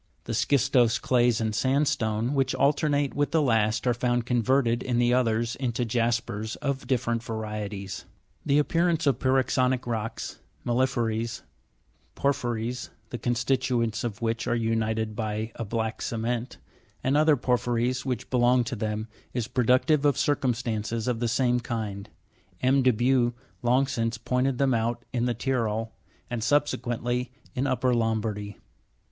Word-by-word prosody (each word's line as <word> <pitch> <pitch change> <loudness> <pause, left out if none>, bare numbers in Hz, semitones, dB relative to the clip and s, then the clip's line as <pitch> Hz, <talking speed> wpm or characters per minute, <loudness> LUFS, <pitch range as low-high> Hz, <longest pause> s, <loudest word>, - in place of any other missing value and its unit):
The - - -4
schistose 125 -4 +3
clays 120 -2 +2
and 110 -1 -1
sandstone, 130 -3 +1
which 135 -2 +1
alternate 145 0 +2
with 145 0 0
the 165 - +2
last, 110 -3 +2
are 125 - +3
found 120 0 0
converted 120 0 +2
in 125 -2 -1
the 120 0 +3
others 115 -1 +1
into 125 -2 -1
jaspers 115 -2 -1
of 140 -2 -3
different 120 -3 0
varieties. 105 -4 -5 0.4
The 145 -1 +2
appearance 165 +2 +2
of 135 -3 +2
pyroxenic 130 -1 +2
rocks, 115 -1 -4 0.3
mela'phyries 115 -2 0 0.7
(porphyries, 120 -3 -1 0.2
the 120 - -4
con 120 0 0
stituents 120 -4 0
of 115 -1 -4
which 115 0 -1
are - - +1
united 110 -1 -1
by 110 0 -3
a - - -5
black 110 +1 -3
cement), 120 +2 -2 0.5
and 135 +2 +2
other 155 0 +5
porphyries 125 0 0
which 125 -3 -4
belong 125 0 +4
to 120 +2 -4
them, 110 0 -3 0.3
is 120 -3 -1
productive 130 +5 +3
of 145 -3 +3
circumstances 115 -5 -1
of 120 -2 0
the 120 - 0
same 125 +1 +2
kind; 110 -4 -4 0.5
M. 135 +2 +4
de 130 - +4
Buch 120 +1 +2 0.3
long 125 +2 +3
since 115 -3 -2
pointed 125 +2 0
them 135 -1 +2
out 120 +1 -1
in 120 -1 +1
the 120 -1 0
Tyrol, 115 -3 -1 0.3
and 120 -2 -3
subsequently 125 -3 0 0.2
in 130 +3 -1
upper 130 -1 +1
Lombardy. 110 -3 -1
120 Hz, 145 wpm, -27 LUFS, 115-130 Hz, 0.7 s, other